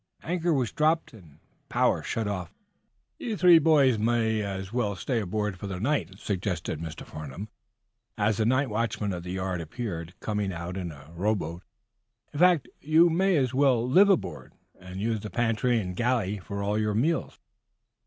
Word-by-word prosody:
Anchor 175 0 0
was 130 -7 +1
dropped 155 -1 +1
and 85 -10 -16 0.3
power - - +2
shut 115 -2 -2
off 95 -4 -3
for - - -35
the - - -22
night. - - -3
"You 215 - -2
three 175 -3 +7
boys 140 -7 +4
may 110 -1 +1
as 95 -1 -5
well 110 -5 0
stay 115 +6 -1
aboard 105 -1 -2
for 100 - -5
the 95 -2 -4
night," 100 - -1
suggested 90 -6 -3
Mr. 80 -1 -7
Farnum, 75 +8 -8 0.7
as 105 0 +1
the 110 - +1
night 130 0 +2
watchman 105 -2 -1
of 90 - -4
the 90 +1 -6
yard 95 -2 -2
appeared, 85 0 -6
coming 105 -2 -2
out 85 +1 -5
in 90 -3 -4
a 70 +1 -14
row 105 +5 +1
boat. 85 -2 -5 0.7
"In 145 - -5
fact, 180 -4 +4
you 160 +3 +4
may 185 +1 +3
as 130 -3 +1
well 130 -3 +3
live 190 +10 +6
aboard, 195 - -1 0.3
and 90 +1 -8
use 110 +1 0
the 105 - -7
pantry 120 +1 +1
and 90 -3 -4
galley 115 -3 0
for 100 +1 -5
all 105 +2 0
your 105 -1 0
meals." 155 +9 0
105 Hz, 185 wpm, -27 LUFS, 95-130 Hz, 0.7 s, three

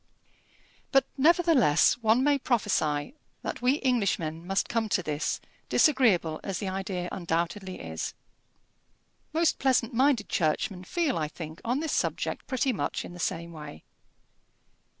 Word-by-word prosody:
But, 270 -1 +4
nevertheless, 295 - +4
one 225 +2 +3
may 285 0 +3
prophesy 190 - 0 0.3
that - - -4
we 260 +4 +2
Englishmen 180 -10 0
must 195 +1 0
come 225 -2 -1
to 185 - +1
this, 150 -1 -2 0.3
disagreeable 205 - +3
as 195 - -3
the 200 - -4
idea 190 -2 -3
undoubtedly 175 +2 -2
is. 80 -1 -5 1.2
Most 325 +1 +1
pleasant 255 -2 +2
minded 255 -3 +2
churchmen 180 +4 -1
feel, 315 - 0
I 155 - -1
think, 160 +1 -9
on 250 +5 0
this 320 - -2
subject - - -2
pretty 260 -1 0
much 205 - -2
in - - -9
the 175 - -10
same 170 0 -2
way. 150 - -10
200 Hz, 135 wpm, -28 LUFS, 165-260 Hz, 1.2 s, But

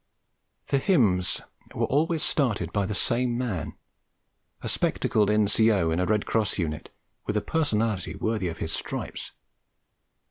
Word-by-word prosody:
The 140 - +3
hymns 105 - +2 0.3
were - - +1
always 155 +3 +1
started 105 - 0
by 100 -2 +1
the 105 - -2
same 120 +3 +1
man, 115 -9 -3 0.9
a - - -3
spectacled 105 -2 +1
N.C.O. 105 -4 +3
in 80 - 0
a 90 - +1
Red 105 -1 +1
Cross 110 -3 0
unit, 75 -4 -3 0.4
with 105 - 0
a - - +1
personality 110 - 0
worthy 105 -1 -1
of 85 - -4
his 80 - -3
stripes. - - -4
105 Hz, 140 wpm, -26 LUFS, 90-120 Hz, 0.9 s, The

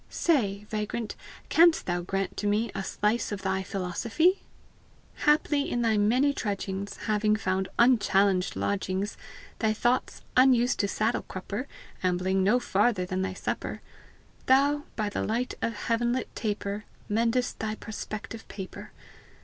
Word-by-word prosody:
Say, 210 - +1
vagrant, 215 +1 -3 0.3
can'st 335 0 +5
thou 175 0 -1
grant 195 +1 -2
to 205 - -1
me 215 +3 +1
A 195 - -3
slice 210 +4 0
of 200 -1 -4
thy 190 0 0
philosophy? 220 - +1 0.9
Haply, 295 -1 +3
in 240 0 0
thy 225 -1 +3
many 245 +7 +3
trudgings, 200 -4 -3
Having 215 0 +2
found 190 -2 -1
unchallenged 200 -6 +3
lodgings, 200 0 -1 0.4
Thy 220 -1 +2
thoughts, 240 +3 0
unused 250 -1 +4
to 200 - +2
saddle 220 +3 0
crupper, 200 +7 -5 0.3
Ambling 185 +1 +1
no 215 +6 +4
farther 205 -4 +1
than 185 +1 -2
thy 190 0 -2
supper - - -3 0.7
Thou, 285 +2 +4
by 215 -2 -1
the 205 - -2
light 240 +3 -1
of 230 - -1
heaven 235 +2 0
lit 255 - -4
taper, 205 -1 -3 0.2
Mendest 230 +3 0
thy 215 -1 -2
prospective 220 +1 -7
paper! 190 -2 -8
215 Hz, 140 wpm, -28 LUFS, 195-240 Hz, 0.9 s, can'st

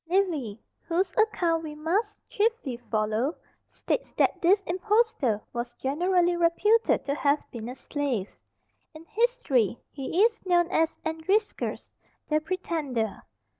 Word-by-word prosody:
Livy, 320 - 0 0.2
whose 355 +2 0
account 350 -7 +2
we 305 -1 -6
must 390 +8 -1
chiefly 425 - 0
follow, 220 +7 0 0.3
states - - -3
that - - +1
this 390 +4 +4
impostor 370 - +1
was 240 0 -4
generally 350 +7 +1
reputed 380 +7 +3
to 280 - 0
have 285 0 +1
been 235 -2 -6
a 250 - -6
slave; 265 -10 -2 0.7
in 315 +1 -11
history 425 - +1
he 300 +8 0
is 455 -1 -1
known 350 -2 +3
as 325 -3 +1
Andriscus 350 +7 -1 0.4
the 305 0 +3
Pretender. 300 - -2
330 Hz, 125 wpm, -27 LUFS, 270-390 Hz, 0.7 s, this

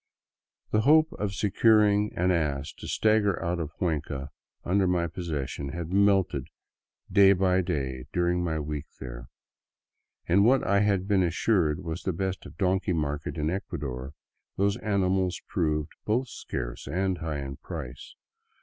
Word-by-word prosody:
The 105 - +3
hope 155 +5 +5
of 100 -2 -2
securing 105 +1 +3
an 90 +2 +2
ass 75 -5 -1
to - - -7
stagger 110 -3 +2
out 85 0 -1
of 80 -2 -3
Cuenca 70 -5 -3 0.3
under 95 +1 +2
my 90 -1 +1
possessions 75 -5 -4
had 85 +1 -5
melted 95 -8 +3 0.6
day 100 -1 +7
by 95 0 +2
day 65 -8 -3
during 90 0 +1
my 80 -2 -1
week 75 -1 -4
there. - - -8 1.0
In 95 +4 +4
what 130 +4 +4
I 100 0 +3
had 100 -2 +1
been 100 -2 +3
assured 90 -2 +1
was 80 +1 -4
the 95 - -2
best 95 +2 -3
donkey 95 -1 +1
market 75 0 -2
in 75 +1 0
Ecuador, 70 -8 -5 0.4
those 100 +1 +2
animals 95 -3 0
proved 75 -3 -1
both 120 +4 0
scarce - - -6
and 95 0 -1
high 80 -2 -3
in 70 0 -6
price. 65 +2 -8
90 Hz, 145 wpm, -27 LUFS, 75-100 Hz, 1.0 s, day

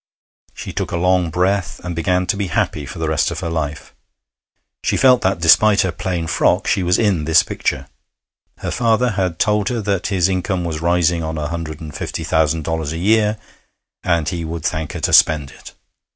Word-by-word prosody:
She - - -7
took - - -3
a - - -1
long 90 0 +2
breath, 90 +3 -1
and 90 -1 -5
began 90 +2 0
to 100 - 0
be 100 -1 -2
happy 75 -3 -2
for 85 - -8
the 80 0 -2
rest 80 -1 +1
of - - -5
her 85 - -3
life. 75 -2 -4 0.9
She - - 0
felt 130 -2 +5
that, 95 -2 0
despite 100 +5 +5
her 95 - 0
plain 85 0 -3
frock, 80 -1 +1
she - - +1
was 90 0 +2
in 95 -9 +1
this 80 0 +5
picture. - - -3 0.7
Her - - -5
father 120 0 +1
had 95 -4 -2
told 105 +1 +1
her 120 -2 -2
that 100 -3 -1
his 95 -3 +1
income 95 -1 -1
was 80 -2 -4
rising 85 0 +1
on 80 0 -4
a 75 -1 -3
hundred 85 -2 -5
and 75 -2 -8
fifty - - -5
thousand 80 0 +1
dollars 80 -1 -3
a - - -4
year, 105 +3 +2 0.7
and 85 -4 0
he 85 -2 -3
would 80 -1 -5
thank 80 -1 -2
her - - -5
to - - 0
spend 75 -4 +4
it. - - -14
85 Hz, 205 wpm, -19 LUFS, 80-95 Hz, 0.9 s, felt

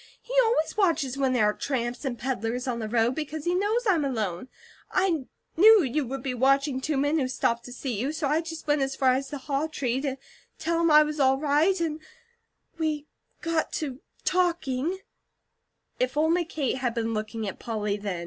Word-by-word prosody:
He - - -9
always 320 -9 +1
watches 325 -10 +1
when 270 -1 +1
there 230 -4 +3
are 210 - +2
tramps 245 -1 -3
and 250 -3 -2
peddlers 250 0 -2
on 240 -2 -1
the 220 -1 -4
road, 230 +2 +2
because 305 +1 -5
he 350 - +1
knows 420 +6 +1
I'm 355 -8 +3
alone. 220 -6 -2 0.4
I 345 -8 +1 0.3
knew 430 +4 +8
he 275 +3 0
would 270 0 -5
be 265 -2 -2
watching 270 +2 +2
two 295 +1 -1
men 290 +3 +2
who 260 - 0
stopped 235 -2 -1
to 245 - -9
see 245 -3 -4
you, 265 +6 -1
so 310 -2 -2
I 305 +3 +2
just 325 -1 -7
went 295 -1 +2
as 270 0 -1
far 260 -1 +3
as 270 +1 -2
the 290 - -5
haw 275 +3 -2
tree 265 -4 -2
to 275 -2 -2 0.4
tell 335 +1 0
him 335 - +3
I 305 0 +8
was 300 0 -4
all 265 -1 +4
right, 305 +6 +2
and 320 -2 -1 0.8
we 305 -2 -1 0.4
got 330 -2 -1
to 275 -4 -3 0.3
talking 345 -3 0 0.5
" - - -47
If - - 0
only 330 +3 +2
Kate 280 -5 -2
had 245 -2 -1
been 230 -1 -1
looking 215 0 -3
at 195 - -6
Polly 210 -3 -2
then! 200 -4 -4
275 Hz, 205 wpm, -27 LUFS, 250-320 Hz, 0.8 s, knew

